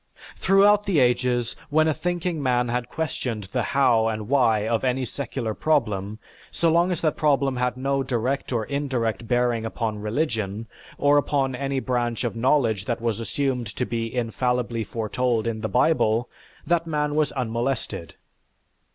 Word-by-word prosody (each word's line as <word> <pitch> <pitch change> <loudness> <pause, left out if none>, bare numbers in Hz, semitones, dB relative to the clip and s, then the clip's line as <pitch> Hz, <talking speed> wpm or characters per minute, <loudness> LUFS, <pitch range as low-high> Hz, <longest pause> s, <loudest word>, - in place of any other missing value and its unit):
Throughout 205 +2 +4
the 195 -5 +1
ages, 125 -2 +2
when 155 +1 +3
a 155 - +2
thinking 175 -1 -2
man 125 -2 +1
had 125 0 -2
questioned 130 -8 -3
the 125 - 0
how 120 -4 +3
and 110 -1 -3
why 115 -5 +3
of 115 -1 0
any 130 0 0
secular 120 -4 -4
problem, 105 -9 0 0.3
so 165 -1 +1
long 170 +3 +3
as 180 -1 -2
that 155 -3 +1
problem 140 -3 +1
had 125 0 -1
no 135 +1 0
direct 130 +2 -2
or 115 -3 0
indirect 120 -6 -2
bearing 120 -1 +1
upon 115 -1 -3
religion, 110 -3 -2 0.3
or 145 0 +4
upon 135 -2 0
any 135 +1 -2
branch 120 -2 -1
of 120 - -2
knowledge 115 -5 +2
that 120 - -2
was 115 -2 -1
assumed 125 +2 -1
to 125 - -1
be 115 -1 -3
infallibly 120 -1 -1
foretold 115 +1 -1
in 115 -2 -2
the 110 - -2
Bible, 120 -4 +2 0.4
that 170 -1 +1
man 150 -2 0
was 150 0 +1
unmolested. 120 -7 -3
125 Hz, 160 wpm, -24 LUFS, 115-140 Hz, 0.4 s, Throughout